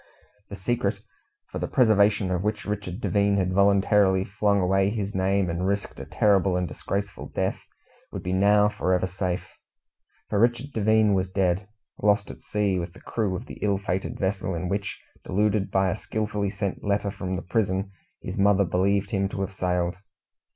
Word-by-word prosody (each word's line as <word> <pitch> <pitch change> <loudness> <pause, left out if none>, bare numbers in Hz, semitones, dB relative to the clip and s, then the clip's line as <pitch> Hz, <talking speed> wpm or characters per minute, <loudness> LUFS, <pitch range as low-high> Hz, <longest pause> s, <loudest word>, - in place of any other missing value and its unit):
The 100 - -6
secret, 115 +5 -1 0.5
for - - -4
the - - -2
preservation 105 -5 +3
of 90 -1 0
which 105 0 -2
Richard 100 -2 -4
Devine 100 -1 +2
had 95 -1 0
voluntarily 100 -1 +4
flung 100 +1 +1
away 95 +1 +2
his 105 -1 -3
name, 95 0 +1
and 85 +2 -1
risked 100 +1 -2
a - - -6
terrible 95 -3 +2
and 90 -1 -1
disgraceful 100 +3 -4
death, - - -1 0.5
would - - -6
be 90 - -2
now 105 +2 +5
for 105 -3 0
ever 90 - 0
safe; 90 0 -3 0.8
for 105 - 0
Richard 120 +5 +1
Devine 110 -1 +3
was 95 -1 0
dead 95 +1 0 0.3
lost 105 -1 +2
at - - -13
sea 100 -3 0
with 85 0 -5
the - - -15
crew 105 -5 -2
of 110 - -6
the - - -10
ill 100 -2 +2
fated 95 -1 -3
vessel 95 -1 -1
in 90 +2 -3
which, 100 +1 -3 0.2
deluded 105 +1 +1
by 95 -1 +2
a - - -1
skilfully 105 -2 -2
sent 100 -1 -4
letter 100 0 0
from 95 -1 -4
the 90 - -4
prison, 95 0 -1 0.3
his - - -5
mother 100 0 +4
believed 100 +5 +1
him 100 -2 0
to 100 - -4
have 95 0 -3
sailed. 90 -2 0
100 Hz, 180 wpm, -25 LUFS, 95-105 Hz, 0.8 s, now